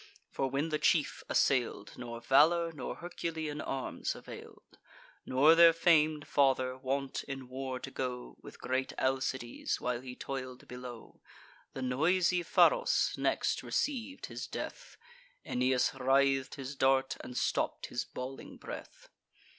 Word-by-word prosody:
for, 135 - -1
when 140 +5 -1
the 150 -1 -1
chief 150 +1 +2
assail'd, 120 -6 +1
Nor 120 -1 -7
valour 165 +7 +4
nor 145 -5 -5
Herculean 160 -3 -4
arms 135 -1 -3
avail'd, - - -12 0.5
Nor 140 +5 +6
their 165 0 +8
fam'd 155 -3 +3
father, 130 -2 +2
wont 135 +1 -2
in 135 -2 -6
war 130 0 -4
to 135 - -8
go 125 -2 -4
With - - -12
great 130 +1 -1
Alcides, 130 -2 -1
while 125 -1 -2
he 125 -1 -8
toil'd 130 -2 -6
below. 125 -2 -9 0.5
The 130 - -5
noisy 175 +8 +2
Pharos - - +3
next - - 0
receiv'd 275 -1 -2
his - - -6
death: - - -7 0.5
Aeneas 125 0 +2
writh'd 135 0 +2
his 135 +1 -6
dart, 135 0 +2
and 125 - -8
stopp'd - - 0
his 120 - -3
bawling 130 +1 -8
breath. - - -9
135 Hz, 130 wpm, -32 LUFS, 130-155 Hz, 0.5 s, their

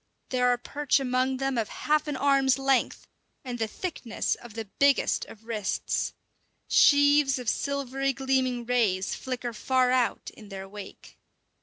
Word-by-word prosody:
There 250 -1 +2
are 245 0 +3
perch 285 +3 0
among 260 0 0
them 270 -2 -1
of 220 - -2
half 305 +1 0
an 295 - -2
arm's 275 -1 +3
length, 270 -1 0 0.4
and 245 -2 -5
the 225 - 0
thickness 255 - -3
of 235 -3 -10
the 225 -1 -4
biggest 280 +7 +2
of 220 0 -14
wrists. 215 -4 -2 0.6
Sheaves 285 -1 +5
of 250 -2 -7
silvery 275 +1 -1
gleaming 260 -2 0
rays 215 -6 +1
flicker 250 -2 -4
far 255 +3 +1
out 250 -2 0
in 210 -2 -14
their 195 -1 -7
wake. 205 0 -11
255 Hz, 150 wpm, -27 LUFS, 235-275 Hz, 0.6 s, Sheaves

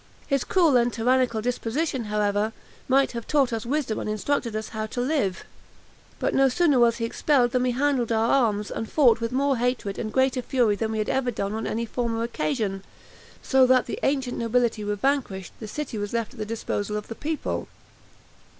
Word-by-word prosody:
His 275 -3 0
cruel 330 -8 +3
and 240 0 +2
tyrannical 235 -1 +1
disposition, 250 +2 -1
however, 210 +1 0 0.3
might 270 +1 +3
have 235 -2 -6
taught 275 -5 +2
us 225 +1 -3
wisdom 270 -5 -1
and - - -4
instructed 230 +2 -1
us 215 0 -4
how 220 -1 -4
to 245 - -5
live; 245 -8 0 0.7
but - - -1
no 270 0 +4
sooner 290 -1 +3
was 235 -1 +4
he 230 - -1
expelled 245 0 +2
than 250 - +1
we 250 - +1
handled 255 -2 +1
our 225 +1 +2
arms, 210 -6 +1
and 225 - -5
fought 240 -7 +4
with 230 - -2
more 275 +1 +1
hatred, 240 -4 -1
and 215 - -3
greater 260 0 +2
fury 240 -4 +2
than 220 +1 -2
we - - -2
had 215 - -1
ever 265 -1 +1
done 200 -3 -3
on 220 0 -3
any 230 +1 -2
former 230 0 -2
occasion; 230 -6 -2 0.6
so 265 -1 +4
that 255 -1 +4
the - - -5
ancient 265 -3 0
nobility 235 -1 +1
were 205 0 -1
vanquished 205 -6 -1
the 220 - -7
city 260 -1 -5
was 205 +1 -4
left 230 +1 -2
at 250 - -14
the 215 - -2
disposal 210 -2 -3
of 210 - -6
the - - -5
people. 305 +6 -3
235 Hz, 200 wpm, -25 LUFS, 220-265 Hz, 0.7 s, no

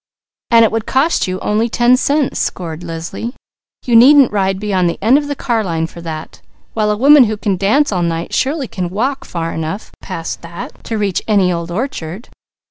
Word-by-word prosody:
"And 230 -1 +6
it - - 0
would 225 -1 -3
cost 275 - +1
you 185 0 -3
only 220 +3 0
ten 240 +2 +4
cents," 280 +2 0
scored 165 -2 -3
Leslie. 170 +8 -6 0.5
"You 240 - +2
needn't 270 +3 +7
ride 195 -2 0
beyond 190 -4 0
the - - -4
end 225 +6 +4
of 290 - -5
the 285 - -3
car 235 -4 -1
line 165 -4 -1
for 170 +1 -10
that, 160 -1 -7 0.3
while 215 -1 0
a 210 - 0
woman 280 +2 +7
who 215 -1 -2
can 205 -2 -1
dance 215 +10 +2
all 180 -3 0
night 170 0 -2
surely 275 -1 0
could 180 -5 -4
walk 255 +9 -2
far 165 -1 -4
enough, 160 +6 -5
to 170 +4 -6
reach 200 -4 -1
any 195 -4 +3
old 170 0 -4
orchard. 190 - -5
210 Hz, 190 wpm, -16 LUFS, 175-240 Hz, 0.5 s, needn't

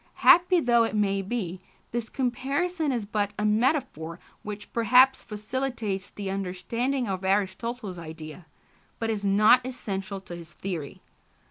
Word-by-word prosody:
Happy 355 +1 +7
though 240 -5 +4
it 225 - -1
may 200 -2 +1
be, 190 -3 -4 0.3
this 235 -1 -3
comparison 280 +6 -1
is 235 -5 -2
but 205 0 -1
a 210 - 0
metaphor 215 - 0 0.2
which 210 0 -8
perhaps 250 +3 +5
facilitates 215 -2 -3
the 200 -1 -6
understanding 220 +8 -2
of 190 -1 -3
Aristotle's 200 +1 -1
idea, 160 0 -9 0.5
but 225 0 -1
is 210 -2 -3
not 210 +5 +5
essential 200 -6 -4
to 175 -2 -8
his 170 -1 -10
theory. 170 -7 -6
210 Hz, 135 wpm, -27 LUFS, 190-245 Hz, 0.5 s, Happy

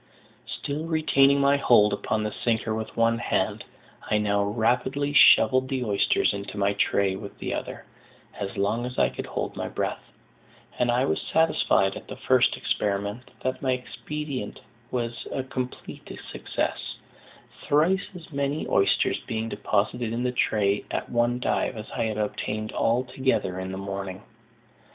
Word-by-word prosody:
Still 150 +3 -4
retaining 140 -4 +4
my 140 0 +4
hold 105 -6 +5
upon 110 +1 -1
the 105 - -2
sinker 110 -1 -1
with 110 0 -5
one 115 0 +3
hand, - - 0 0.5
I 105 - +3
now 100 -1 +1
rapidly 125 +7 0
shovelled 130 -3 +6
the 130 -2 -1
oysters 105 -4 +2
into 100 +1 -6
my 100 0 +2
"tray" 100 -1 +1
with 100 +1 -8
the - - -3
other, - - -5 0.5
as 100 -1 -5
long 110 +5 0
as 125 - -8
I - - +4
could - - -6
hold - - -3
my - - -3
breath; - - -3 0.8
and 125 - +2
I 125 +2 +3
was 80 - 0
satisfied, 95 -11 +2
at - - -9
the - - -7
first - - +3
experiment, 100 +4 -2
that 130 0 -2
my 130 -2 +2
expedient 125 0 -5 0.3
was 120 -1 -3
a 135 - -2
complete 130 -1 -6 0.2
success, - - -3 0.7
thrice 170 +7 +3
as 170 -2 -11
many 140 +2 -1
oysters 100 - +2
being 110 0 -2
deposited 110 +3 -1
in 120 +2 -2
the 125 - +1
tray 105 -4 +1
at - - -3
one 120 +1 +1
dive 125 - 0
as 110 - -8
I - - -1
had 110 -1 -2
obtained 110 0 -2
altogether 125 -5 0
in 95 0 -4
the 95 - -5
morning. 95 0 -5
115 Hz, 155 wpm, -26 LUFS, 105-130 Hz, 0.8 s, shovelled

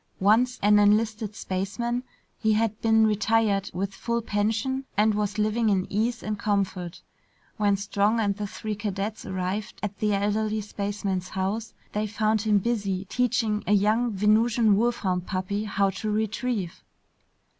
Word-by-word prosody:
Once 230 +6 +3
an 210 0 +6
enlisted 215 0 +2
spaceman, 220 +7 -2 0.4
he 220 -1 +2
had 220 0 0
been 220 -1 +4
retired 215 -2 +2
with 195 +3 -3
full 235 +3 -2
pension 225 +5 -1
and 215 +1 +4
was 210 0 -1
living 215 +1 +1
in 190 -2 +2
ease 230 +3 0
and 210 -1 -3
comfort. 195 -4 -2 0.5
When 205 -1 +2
Strong 200 +3 +1
and 200 -2 +1
the 205 0 -4
three 215 +2 -5
cadets 205 +1 -4
arrived 190 +3 -3
at 205 -1 -4
the 210 -2 +1
elderly 215 +2 0
spaceman's 200 -3 -3
house, 195 +4 -3 0.2
they 210 +1 -1
found 215 0 +1
him 215 -1 +3
busy 200 -3 -1
teaching 225 -4 0
a 210 - +3
young 215 +4 +2
Venusian 215 +2 +3
wolfhound 195 -5 0
puppy 195 +3 -2
how 200 -1 +1
to 205 +3 -4
retrieve. 215 -3 -2
210 Hz, 145 wpm, -26 LUFS, 200-220 Hz, 0.5 s, an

